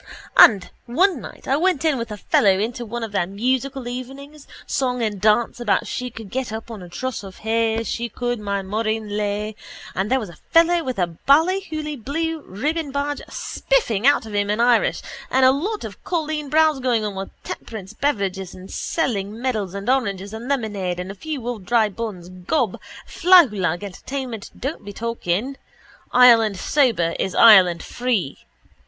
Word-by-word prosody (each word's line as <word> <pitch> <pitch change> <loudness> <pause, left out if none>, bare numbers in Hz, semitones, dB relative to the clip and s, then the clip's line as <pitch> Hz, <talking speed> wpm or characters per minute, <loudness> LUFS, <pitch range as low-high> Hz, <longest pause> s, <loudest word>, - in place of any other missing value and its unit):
And 200 -5 +7 0.2
one 330 +4 +2
night - - -11
I 270 - +2
went 335 -2 +1
in 295 -5 +2
with 230 - -4
a 210 - -6
fellow 200 - +3
into 235 +3 -3
one 235 +2 -4
of 225 - -5
their 175 -4 0
musical 255 +5 -2
evenings, 270 +4 -8 0.2
song 250 -2 -1
and 205 -3 -2
dance 220 +3 +2
about 235 -4 +1
she 250 0 -4
could 225 -4 -10
get 260 -3 -3
up 220 +1 -6
on 215 -4 -8
a 180 - -10
truss 255 +6 -4
of 195 -2 -11
hay 225 0 +1
she 235 +1 -3
could 245 +1 -3
my 200 -1 -2
Maureen 215 +2 -2
Lay 210 +1 -2 0.4
and 190 +3 -1
there 265 - +3
was 215 -6 -6
a 170 - -13
fellow 335 +1 +4
with 255 -4 -4
a 180 - +2 0.2
Ballyhooly 310 -1 +2
blue 325 +4 -2
ribbon 290 - -3
badge 285 +1 -2
spiffing 265 - 0
out 285 -4 +4
of 215 - -9
him 205 0 0
in 210 +2 0
Irish 240 0 +3 0.3
and 260 0 +4
a 260 - +7
lot 390 +11 -2
of - - -9
colleen 310 -4 -2
bawns 310 -1 +3
going 240 -4 +1
about 205 -2 -4
with 195 0 -8
temperance 205 -5 -7
beverages 195 -9 -2
and 185 +1 -11
selling 215 -8 -2
medals 215 -7 -2
and 200 +2 -6
oranges 200 -6 0
and 225 +3 -7
lemonade 205 -9 -2
and 180 +2 -5
a - - -7
few 275 +2 -6
old 235 -5 -4
dry 220 +2 +2
buns, 200 -4 -6
gob, 185 - -2 0.3
flahoolagh 210 - +4
entertainment, 230 +3 -6
don't 270 -2 -4
be 205 0 -8
talking. 230 +3 -2 0.5
Ireland 230 -5 +6
sober 225 - +2
is 190 - -2
Ireland 185 -7 +7
free. 240 - -2
230 Hz, 175 wpm, -22 LUFS, 205-275 Hz, 0.5 s, And